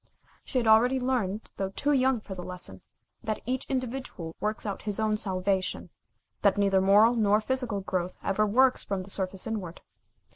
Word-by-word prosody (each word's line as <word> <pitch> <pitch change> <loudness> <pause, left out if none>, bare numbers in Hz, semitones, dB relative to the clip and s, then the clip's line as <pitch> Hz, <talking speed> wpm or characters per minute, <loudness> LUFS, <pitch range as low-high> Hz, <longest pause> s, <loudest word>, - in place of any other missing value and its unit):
She 265 - -3
had 245 - +1
already 235 +4 +5
learned, 230 -5 -2
though 195 -1 -2
too 285 +9 -1
young 260 -4 +2
for 200 - -8
the 185 - -7
lesson, 180 - -6 0.4
that 215 -1 -2
each 255 +2 -2
individual 255 -10 -4
works 215 +1 -2
out 200 -2 -4
his 210 0 -2
own 215 -1 +1
salvation, 190 -2 -1 0.5
that - - +3
neither 195 -1 +3
moral 205 +5 +6
nor 210 -3 +3
physical 230 -3 -2
growth 185 -1 -3
ever 210 +2 +1
works 255 +5 +3
from 195 -2 -3
the 195 - -8
surface 190 -1 0
inward. 200 -7 -4
210 Hz, 175 wpm, -28 LUFS, 190-245 Hz, 0.5 s, moral